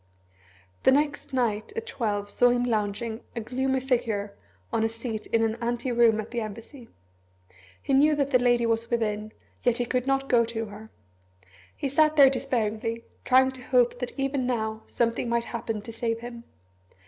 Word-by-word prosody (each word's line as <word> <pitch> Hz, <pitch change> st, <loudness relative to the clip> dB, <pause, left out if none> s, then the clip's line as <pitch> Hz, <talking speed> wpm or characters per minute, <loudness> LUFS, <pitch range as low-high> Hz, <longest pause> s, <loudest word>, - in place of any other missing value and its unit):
The -, -, +5 dB
next 285 Hz, +1 st, 0 dB
night 240 Hz, -, -1 dB
at 455 Hz, 0 st, -3 dB
twelve 210 Hz, -, -2 dB
saw 245 Hz, +3 st, +4 dB
him 245 Hz, 0 st, +2 dB
lounging, 220 Hz, 0 st, -2 dB
a -, -, -1 dB
gloomy 260 Hz, +3 st, -1 dB
figure, 225 Hz, -6 st, -1 dB, 0.4 s
on 220 Hz, -, +2 dB
a 225 Hz, -, +2 dB
seat 225 Hz, -1 st, -5 dB
in 225 Hz, 0 st, +2 dB
an 225 Hz, 0 st, 0 dB
ante 240 Hz, +2 st, -1 dB
room 230 Hz, -2 st, +4 dB
at 215 Hz, -, -6 dB
the 240 Hz, -1 st, -2 dB
Embassy. 230 Hz, +4 st, -9 dB, 0.9 s
He -, -, -2 dB
knew 300 Hz, +3 st, +5 dB
that 280 Hz, -1 st, 0 dB
the 250 Hz, -, +5 dB
Lady 240 Hz, -1 st, +3 dB
was 230 Hz, 0 st, 0 dB
within, 215 Hz, -2 st, -1 dB, 0.3 s
yet 245 Hz, -2 st, +2 dB
he 245 Hz, -, 0 dB
could 250 Hz, +2 st, -1 dB
not 270 Hz, 0 st, +1 dB
go 240 Hz, -3 st, +4 dB
to 225 Hz, 0 st, -3 dB
her. 215 Hz, +1 st, -11 dB, 0.9 s
He -, -, -2 dB
sat 305 Hz, +3 st, +3 dB
there 275 Hz, -3 st, +8 dB
despairingly, 230 Hz, -3 st, -2 dB, 0.2 s
trying 260 Hz, +1 st, +5 dB
to 260 Hz, -1 st, -11 dB
hope 245 Hz, -1 st, +2 dB
that 250 Hz, +2 st, -5 dB
even 270 Hz, -2 st, -1 dB
now 220 Hz, -3 st, -2 dB
something 235 Hz, 0 st, 0 dB
might 235 Hz, 0 st, +1 dB
happen 225 Hz, -3 st, -4 dB
to 230 Hz, -, -8 dB
save 230 Hz, 0 st, -2 dB
him. 235 Hz, -1 st, -8 dB
235 Hz, 180 wpm, -26 LUFS, 225-260 Hz, 0.9 s, there